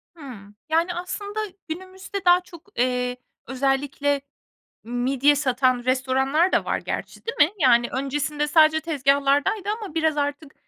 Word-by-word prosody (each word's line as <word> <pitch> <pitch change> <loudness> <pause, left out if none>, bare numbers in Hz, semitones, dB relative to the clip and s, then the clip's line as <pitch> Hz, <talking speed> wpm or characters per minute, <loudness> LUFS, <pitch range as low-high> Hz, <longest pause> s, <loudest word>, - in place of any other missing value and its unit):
Hımm. 220 -10 -11
Yani, 335 +3 +1
aslında 405 +4 -5 0.3
günümüzde 375 +3 -7
daha 355 0 +6
çok, 345 0 -15
eee, 250 0 0 0.3
özellikle 275 +2 0 0.6
midye 260 +5 +2
satan 255 -3 +1
restoranlar 265 +6 +1
da - - +2
var - - -1
gerçi, - - -5
değil 465 - -3
mi? - - -26
Yani, 240 -2 +5
öncesinde 295 +3 -1
sadece 315 0 +5
tezgahlardaydı 285 +5 +1
ama 385 -7 -7
biraz 320 -2 +1
artık, 290 0 -3
285 Hz, 130 wpm, -23 LUFS, 260-330 Hz, 0.6 s, daha